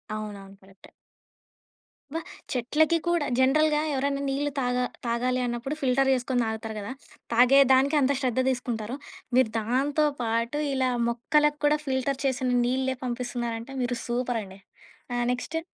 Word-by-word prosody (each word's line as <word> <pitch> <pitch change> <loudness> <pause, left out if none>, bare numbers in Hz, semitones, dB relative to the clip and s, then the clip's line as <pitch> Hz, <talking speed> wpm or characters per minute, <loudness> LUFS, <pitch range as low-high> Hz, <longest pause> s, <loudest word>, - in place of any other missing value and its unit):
అవునవును. 200 -2 -7
కరెక్టే. 195 0 -18 1.2
అబ్బా! 325 +1 -3 0.3
చెట్లకి 305 +7 +2
కూడా, 345 -3 +2
జనరల్‌గా 300 +3 +4
ఎవరన్నా 275 +1 0
నీళ్లు 285 +2 -1
తాగా 250 0 0 0.2
తాగాలి 250 +2 0
అన్నప్పుడు 240 +4 -3
ఫిల్టర్ 270 +1 +2
జే‌సుకొని 250 0 0
దాగుతారు 220 0 -4
గదా. 205 +3 -6 0.4
తాగేదానికంత 270 +3 +5
శ్రద్ధ 255 -1 0
దీసుకుంటారు. 240 -2 -3 0.4
మీరు 255 -4 +4
దాంతో 275 +7 +1 0.2
పాటు 230 +5 -1
ఇలా 260 -1 +1 0.2
మొక్కలక్కూడా 295 +5 +2
ఫిల్టర్ 265 +1 -1
చేసిన 255 -1 +1
నీళ్ళే 260 +1 0
పంపిస్తున్నారంటే 240 0 -4
మీరు 245 -1 -1
సూపరండి. 235 -5 -3 0.6
ఆహ్, 240 0 0
నెక్స్టు. 320 +6 -3
255 Hz, 120 wpm, -26 LUFS, 235-275 Hz, 1.2 s, తాగేదానికంత